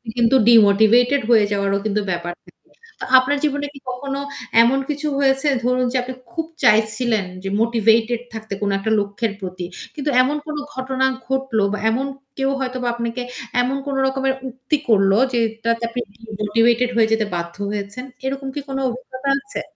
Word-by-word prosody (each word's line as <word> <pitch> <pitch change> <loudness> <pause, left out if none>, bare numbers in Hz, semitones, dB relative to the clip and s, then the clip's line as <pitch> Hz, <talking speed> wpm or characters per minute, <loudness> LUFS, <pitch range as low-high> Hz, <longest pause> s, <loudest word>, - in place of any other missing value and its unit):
কিন্তু 235 +1 +3
ডিমোটিভেটেড 230 +5 +5
হয়ে 220 -3 +6
যাওয়ারও 200 -1 +1
কিন্তু 210 0 0
ব্যাপার 175 0 -3
থাকে। - - -18 0.5
তো - - -4
আপনার 280 +3 0
জীবনে 290 -1 0
কি 275 - -12
কখনো 275 +2 -4 0.4
এমন 250 +4 +3
কিছু 295 +1 -2
হয়েছে 270 +1 +2 0.2
ধরুন 250 +1 +2
যে 260 - 0
আপনি 260 - -6 0.2
খুব 325 +5 -3 0.2
চাইছিলেন 220 -1 +3 0.2
যে 195 - -3
মোটিভেটেড 230 0 +2
থাকতে 220 -2 -6
কোন 205 - 0
একটা 220 +3 -2
লক্ষ্যের 205 +2 -2
প্রতি। 185 -1 -5 0.3
কিন্তু 295 0 -2
এমন 285 +4 +1
কোন 305 - -4 0.2
ঘটনা 260 0 -1 0.2
ঘটল 265 -3 -1 0.2
বা - - -1
এমন 250 +5 0 0.3
কেউ 270 0 +1
হয়তো 255 -1 -3
বা 245 - -1
আপনাকে 235 +1 -3 0.4
এমন 260 +2 0
কোন 280 -1 -3
রকমের 265 0 0 0.2
উক্তি 260 +4 -2
করল, 195 -3 +4 0.2
যেইটাতে 230 0 0
আপনি 240 +1 -4 0.3
ডিমোটিভেটেড 230 +3 +2
হয়ে 225 -1 +4
যেতে 220 -1 +1
বাধ্য 170 0 -4 0.2
হয়েছেন। 205 +3 -5 0.2
এরকম 270 0 -3
কি 290 - -2
কোন 270 - -3
অভিজ্ঞতা 260 +2 -5
আছে? 275 - -6
240 Hz, 165 wpm, -20 LUFS, 215-265 Hz, 0.5 s, হয়ে